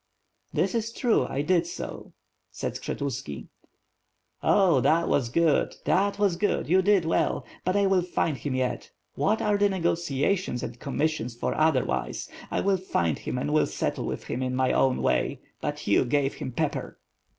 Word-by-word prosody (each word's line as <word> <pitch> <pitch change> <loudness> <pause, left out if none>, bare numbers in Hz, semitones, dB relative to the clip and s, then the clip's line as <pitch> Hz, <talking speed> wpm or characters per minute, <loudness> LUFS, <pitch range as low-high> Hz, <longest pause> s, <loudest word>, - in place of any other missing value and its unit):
"That - - 0
is 230 -1 -1
true, 235 0 +1
I 140 +2 -2
did 170 +1 +2
so," - - -7 0.4
said - - -4
Skshetuski. 135 - -5 0.9
"Oh 185 -9 +4
that 165 +6 +3
was 125 -4 +1
good, 160 +3 +2
that 200 +1 +2
was 200 -4 +2
good, 205 +3 0
you 185 +4 +4
did 195 -3 +3
well; 165 - 0 0.2
but 185 +2 0
I 200 0 +3
will 190 -1 +3
find 175 -3 -1
him 135 0 -3
yet. 130 -1 -2 0.2
What 155 +10 +1
are 210 -1 +2
the 205 0 +4
negotiations 170 -4 0
and 120 0 -6
commissions 140 -3 -1
for, 120 - -2
otherwise. 130 - 0 0.2
I - - 0
will 195 -1 +2
find 85 - -1
him - - -4
and 150 +4 -1
will 155 - +3
settle - - -2
with - - -4
him 125 - -4
in 130 0 -1
my 130 0 +2
own 130 -1 +2
way. - - +1 0.2
But - - -4
you - - +4
gave 140 +2 +1
him 130 - -6
pepper." - - -2
155 Hz, 175 wpm, -27 LUFS, 130-190 Hz, 0.9 s, Oh